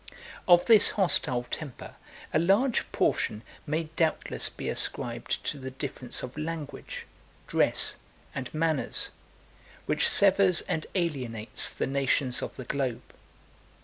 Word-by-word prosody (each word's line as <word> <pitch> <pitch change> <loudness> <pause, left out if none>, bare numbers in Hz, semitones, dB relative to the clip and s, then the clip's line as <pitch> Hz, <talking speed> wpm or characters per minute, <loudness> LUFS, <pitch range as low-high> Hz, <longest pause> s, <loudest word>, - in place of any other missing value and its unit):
Of 175 -1 +7
this 225 -3 +7
hostile 150 -10 +1
temper, 140 +1 -7 0.4
a - - +4
large 205 +9 +2
portion 105 +1 0 0.2
may 155 +3 0
doubtless 160 -2 +1
be - - -7
ascribed 120 -1 -2
to 145 - -3
the 130 0 -5
difference 130 -2 -5
of 125 - -7
language, 155 -1 -6 0.4
dress, - - +2 0.4
and 130 - -5
manners, 155 -2 +1 0.7
which - - +3
severs 195 -3 +4
and 155 - -3
alienates 130 - -2
the - - -2
nations 135 -1 0
of - - -5
the 130 - -7
globe. 130 -3 -3
150 Hz, 120 wpm, -28 LUFS, 130-170 Hz, 0.7 s, Of